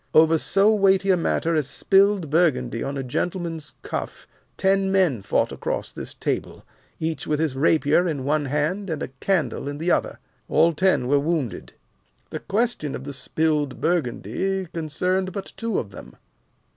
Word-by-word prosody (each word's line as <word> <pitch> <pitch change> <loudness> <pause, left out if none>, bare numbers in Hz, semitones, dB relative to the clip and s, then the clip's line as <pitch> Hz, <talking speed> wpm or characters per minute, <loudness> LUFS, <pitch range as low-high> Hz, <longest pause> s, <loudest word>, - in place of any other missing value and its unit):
Over 160 0 +6
so 200 +6 +3
weighty 195 -1 +3
a - - +5
matter 165 -1 0
as 155 -4 +1
spilled 195 +1 +2
Burgundy 130 -8 +2
on 140 +1 -3
a 135 - -3
gentleman's 165 +3 -3
cuff, - - -5 0.3
ten 195 0 +2
men 180 - +2
fought 100 - 0
across - - -3
this - - -7
table, - - -3 0.3
each 160 -3 -3
with 150 -1 0
his 155 -4 0
rapier 155 +4 +3
in 145 -5 -2
one 150 +2 +1
hand 150 +8 -1
and 160 -3 -3
a - - -5
candle 155 - 0
in 145 0 -4
the 170 +4 0
other. - - 0 0.3
All 165 +1 +4
ten 185 -5 +2
were 140 +2 +3
wounded. 145 - -2 0.6
The - - -4
question 215 - -1
of - - -7
the 140 +1 -6
spilled 150 -1 -1
Burgundy 175 - -1
concerned 180 +4 -1
but 195 0 -6
two 230 -3 -2
of 105 - -3
them. - - -11
160 Hz, 165 wpm, -23 LUFS, 145-190 Hz, 0.6 s, Over